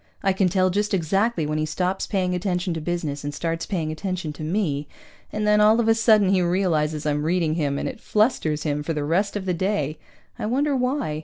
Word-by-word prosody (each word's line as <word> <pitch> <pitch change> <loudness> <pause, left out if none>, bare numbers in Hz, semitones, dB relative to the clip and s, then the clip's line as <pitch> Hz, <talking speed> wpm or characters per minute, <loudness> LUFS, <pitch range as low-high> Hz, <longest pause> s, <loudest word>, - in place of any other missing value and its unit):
I 195 -1 +3
can 190 -1 +2
tell 185 +1 +2
just 205 +2 0
exactly 195 +1 +1
when 155 +1 -1
he 155 - 0
stops 185 +4 -1
paying 185 -3 0
attention 180 -1 -1
to 160 - -4
business 155 -4 -3
and 145 0 -4
starts 165 +1 -3
paying 165 -6 -2
attention 175 -1 -4
to 150 - -11
me, 155 -4 -1 0.4
and 210 0 -2
then 210 0 +4
all 215 +2 +5
of 230 - +1
a 225 - +6
sudden 220 -3 +4
he 190 -1 +3
realizes 160 -4 0
I'm 150 -1 0
reading 165 0 +1
him, 145 -4 -1
and - - -2
it - - -7
flusters 185 - +1
him 150 -1 -1
for 165 +2 -2
the 150 -1 -2
rest 185 +8 0
of 200 -2 -3
the 185 - 0
day. 170 -5 -1 0.4
I 210 - -2
wonder 280 +5 +1
why? 250 - -1
180 Hz, 225 wpm, -24 LUFS, 155-205 Hz, 0.4 s, a